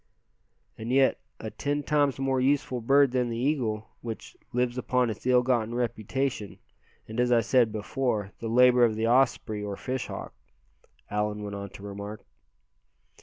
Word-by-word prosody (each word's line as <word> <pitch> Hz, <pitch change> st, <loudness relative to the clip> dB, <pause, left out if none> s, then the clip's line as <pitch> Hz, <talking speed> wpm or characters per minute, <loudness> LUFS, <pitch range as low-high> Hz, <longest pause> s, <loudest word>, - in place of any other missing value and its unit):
"And 115 Hz, +2 st, -4 dB
yet 135 Hz, 0 st, +4 dB, 0.2 s
a 110 Hz, -, -6 dB
ten 145 Hz, 0 st, -2 dB
times 145 Hz, -2 st, +2 dB
more 135 Hz, -1 st, 0 dB
useful 130 Hz, -2 st, +1 dB
bird 140 Hz, +3 st, +4 dB
than 125 Hz, -1 st, 0 dB
the 115 Hz, -, -3 dB
eagle, 120 Hz, -5 st, -1 dB
which 115 Hz, -2 st, -7 dB, 0.2 s
lives 125 Hz, 0 st, 0 dB
upon 125 Hz, -1 st, +1 dB
its 110 Hz, -, -7 dB
ill 125 Hz, -1 st, +5 dB
gotten 120 Hz, -2 st, 0 dB
reputation, 120 Hz, -1 st, -2 dB, 0.5 s
and 110 Hz, +2 st, -5 dB
as 125 Hz, 0 st, +2 dB
I 120 Hz, -1 st, +5 dB
said 115 Hz, 0 st, +3 dB
before, 110 Hz, -1 st, -2 dB
the 115 Hz, -, -4 dB
labor 125 Hz, +1 st, +6 dB
of 115 Hz, -2 st, +3 dB
the 110 Hz, +1 st, 0 dB
osprey, 120 Hz, -3 st, +2 dB
or 100 Hz, -1 st, -4 dB
fish 130 Hz, 0 st, -3 dB
hawk," -, -, -7 dB, 0.8 s
Allan 105 Hz, 0 st, -1 dB
went 100 Hz, -1 st, -5 dB
on 100 Hz, 0 st, -6 dB
to 100 Hz, -, -12 dB
remark. 100 Hz, +1 st, -7 dB
120 Hz, 165 wpm, -27 LUFS, 110-130 Hz, 0.8 s, labor